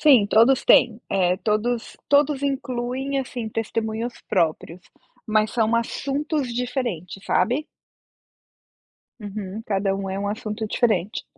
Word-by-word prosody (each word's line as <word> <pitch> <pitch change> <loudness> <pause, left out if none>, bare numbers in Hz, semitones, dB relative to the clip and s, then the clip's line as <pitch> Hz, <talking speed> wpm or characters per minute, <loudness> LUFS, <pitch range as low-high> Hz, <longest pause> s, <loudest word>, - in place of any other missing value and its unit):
Sim, 260 -9 +6
todos 230 +5 +4
têm. 235 -1 +5
É, 180 -1 +2
todos 225 +3 -1
todos 285 -1 +3
incluem, 265 0 -2
assim, 245 -3 -4
testemunhos 225 +1 -2 0.2
próprios, 170 0 0 0.5
mas 215 -1 +2
são 225 -1 +2
assuntos 280 +4 -1
diferentes, 235 - -3
sabe? 250 +11 +1 1.5
Uhum. 205 0 -6
Cada 195 -1 0
um 195 0 -4
é 190 +1 -3
um 200 0 -2
assunto 215 +1 -4
diferente. 215 -2 0
225 Hz, 115 wpm, -23 LUFS, 205-255 Hz, 1.5 s, Sim